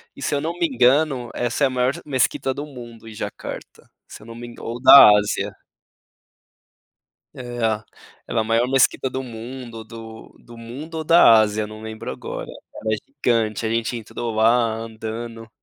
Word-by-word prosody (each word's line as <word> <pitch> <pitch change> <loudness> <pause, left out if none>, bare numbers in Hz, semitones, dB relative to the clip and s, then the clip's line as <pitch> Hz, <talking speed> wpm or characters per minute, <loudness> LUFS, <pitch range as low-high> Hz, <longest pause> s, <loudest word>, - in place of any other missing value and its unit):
e - - -12
se - - -1
eu 145 - +1
não 165 +3 -2
me 170 - +1
engano, 130 -1 +2
essa 120 +4 -1
é - - +4
a - - -3
maior 125 +1 0
mesquita 130 -1 0
do 145 +3 -6
mundo, 120 -5 -12
em - - -10
Jacarta, 105 - -8 0.2
se - - -12
eu - - -15
não 115 - -9
me 120 0 -8
engan 120 - -12
ou 120 +1 -5
da 135 -3 +10
Ásia. 105 0 -1 1.8
É, - - -8 0.9
ela 115 - 0
maior 115 +2 +1
Mesquita 135 0 +2
do 130 +1 -4
mundo, 115 -1 -8
do 110 -1 -11
do 120 0 -15
mundo 135 +8 -9
ou 160 - -3
da 155 -9 +7
Ásia, 110 0 +1
eu 105 - -3
não 110 0 -11
lembro 110 0 -6
agora. - - -6 0.4
Mas 110 -1 0
gigante, 115 -6 -1
a 110 - 0
gente 115 +1 -1
entrou 115 0 -5
lá 115 0 +3
andando. 115 0 -7
115 Hz, 175 wpm, -22 LUFS, 110-130 Hz, 1.8 s, da